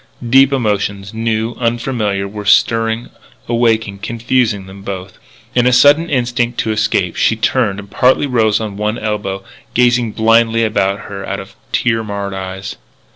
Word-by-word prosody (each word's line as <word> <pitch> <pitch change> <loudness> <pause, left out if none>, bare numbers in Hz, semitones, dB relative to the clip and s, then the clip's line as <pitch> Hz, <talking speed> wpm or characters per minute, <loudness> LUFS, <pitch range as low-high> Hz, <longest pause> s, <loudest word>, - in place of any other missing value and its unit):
Deep 135 +3 +5
emotions, 100 -5 -1
new, 115 0 -1
unfamiliar, 115 -4 -1
were 105 +1 -7
stirring, 115 +2 +2 0.4
awaking, 115 -4 +1
confusing 115 -1 -1
them 95 +1 -12
both. 95 -1 -7 0.3
In 125 -1 +3
a - - +4
sudden 145 +6 +5
instinct 120 -2 -1
to 110 - -2
escape, 105 -5 0
she 110 - +2
turned 110 -2 0
and 100 -1 -10
partly 130 +3 +3
rose 110 -5 +2
on 105 -3 -5
one 105 +2 -1
elbow, 100 -2 -3 0.3
gazing 120 -2 +2
blindly 115 0 +3
about 100 -2 0
her 100 -1 -7
out 100 +1 -4
of 95 - -11 0.2
tear 115 -2 +1
marred 100 -2 -4
eyes. 95 0 -6
110 Hz, 150 wpm, -16 LUFS, 100-120 Hz, 0.4 s, Deep